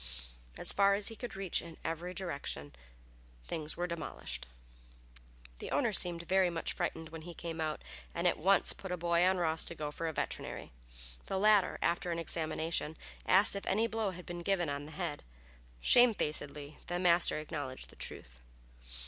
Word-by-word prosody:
As - - +5
far 200 0 +5
as 200 0 +4
he 225 - -7
could 245 -1 -6
reach 195 -3 0
in 165 -1 -10
every 165 +2 -3
direction 140 - -4 0.7
things 155 - -4
were 175 - 0
demolished. 65 - -4 1.1
The - - -6
owner - - +1
seemed 170 -1 +4 0.2
much 165 -1 -3
frightened 160 -1 -3
when 160 0 -8
he 170 +1 -9
came 165 -1 -5
out, 155 -1 -2 0.3
and 170 +1 +1
at - - +1
once 195 +5 +4
put 190 - -8
a 180 - -1
boy 170 0 +2
on 185 +1 +4
Ross 160 -2 +1
to 170 - -3
go 150 -2 -4
for 165 +2 -3
a - - -1
veterinary. - - -4 0.6
The 195 - -1
latter, 205 -1 +4
after 170 +1 +1
an 170 - -1
examination, 160 -1 -2 0.3
asked 195 +2 +6
if 200 - -5
any 215 +4 +2
blow 225 -2 -1
had 180 -1 -8
been 175 0 -6
given 175 -3 +1
on 145 +1 -4
the - - -10
head. 170 -4 -3 0.6
Shamefacedly 150 - +3
the 175 - -1
master 175 -2 +4
acknowledged 145 -4 -5
the - - -16
truth. - - -5
170 Hz, 175 wpm, -33 LUFS, 155-185 Hz, 1.1 s, asked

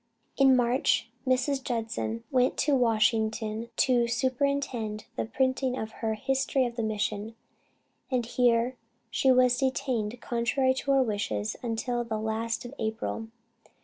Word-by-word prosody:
In 270 -1 +6
March, 245 -1 +2 0.2
Mrs. 260 +1 +1
Judson 220 - -3
went 255 -1 +2
to 295 - +2
Washington 220 -1 +1
to 245 -2 +3
superintend 250 -3 -1
the - - -1
printing 260 +2 0
of 220 -2 -4
her 220 -1 0
History 270 +2 +1
of 240 -1 -4
the 235 - -2
Mission, 215 0 -2 0.7
and 250 -3 0
here 245 +1 +2 0.3
she 265 - +3
was 250 -1 +4
detained 255 -4 -1
contrary 245 +3 +1
to 265 +1 -5
her 270 -1 +5
wishes 200 - -2
until 240 +1 -2
the 225 -2 -3
last 220 +2 -2
of 245 - -8
April. 220 0 -3
240 Hz, 135 wpm, -28 LUFS, 220-260 Hz, 0.7 s, In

